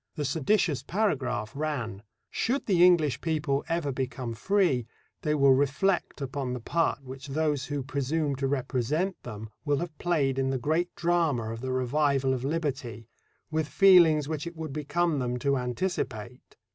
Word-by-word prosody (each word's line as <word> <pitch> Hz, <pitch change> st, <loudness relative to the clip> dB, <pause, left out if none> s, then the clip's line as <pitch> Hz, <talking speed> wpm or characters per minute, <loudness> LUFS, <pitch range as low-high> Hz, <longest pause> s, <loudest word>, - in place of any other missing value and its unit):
The 150 Hz, -, -2 dB
seditious 160 Hz, +1 st, +1 dB
paragraph 145 Hz, -, -1 dB
ran: 135 Hz, -9 st, -3 dB, 0.3 s
Should 260 Hz, +5 st, -1 dB
the 180 Hz, -4 st, +4 dB
English 155 Hz, -8 st, +4 dB
people 150 Hz, -4 st, 0 dB
ever 165 Hz, -4 st, 0 dB
become 125 Hz, -2 st, -3 dB
free, 155 Hz, -, +1 dB, 0.3 s
they 150 Hz, -1 st, 0 dB
will 140 Hz, -2 st, +5 dB
reflect 145 Hz, +6 st, +1 dB
upon 135 Hz, -1 st, -3 dB
the 125 Hz, -, -4 dB
part 165 Hz, +3 st, 0 dB
which 130 Hz, +1 st, -9 dB
those 145 Hz, -1 st, 0 dB
who 145 Hz, -2 st, -3 dB
presume 140 Hz, +2 st, -1 dB
to 135 Hz, 0 st, -1 dB
represent 140 Hz, +7 st, -1 dB
them 110 Hz, -2 st, -8 dB
will 145 Hz, -2 st, +1 dB
have 170 Hz, 0 st, -4 dB
played 140 Hz, -6 st, +1 dB
in 135 Hz, 0 st, +1 dB
the 135 Hz, -, 0 dB
great 160 Hz, +7 st, 0 dB
drama 165 Hz, -10 st, +1 dB
of 115 Hz, -, -7 dB
the 130 Hz, 0 st, -3 dB
revival 135 Hz, +1 st, +1 dB
of 130 Hz, -1 st, -3 dB
liberty, 135 Hz, -7 st, -3 dB, 0.4 s
with 155 Hz, -1 st, 0 dB
feelings 170 Hz, -6 st, +6 dB
which 155 Hz, +1 st, -3 dB
it 170 Hz, -, -7 dB
would 160 Hz, -3 st, -5 dB
become 150 Hz, +1 st, 0 dB
them 125 Hz, -1 st, -1 dB
to 140 Hz, +3 st, +1 dB
anticipate. 125 Hz, -, -4 dB
145 Hz, 160 wpm, -28 LUFS, 130-160 Hz, 0.4 s, feelings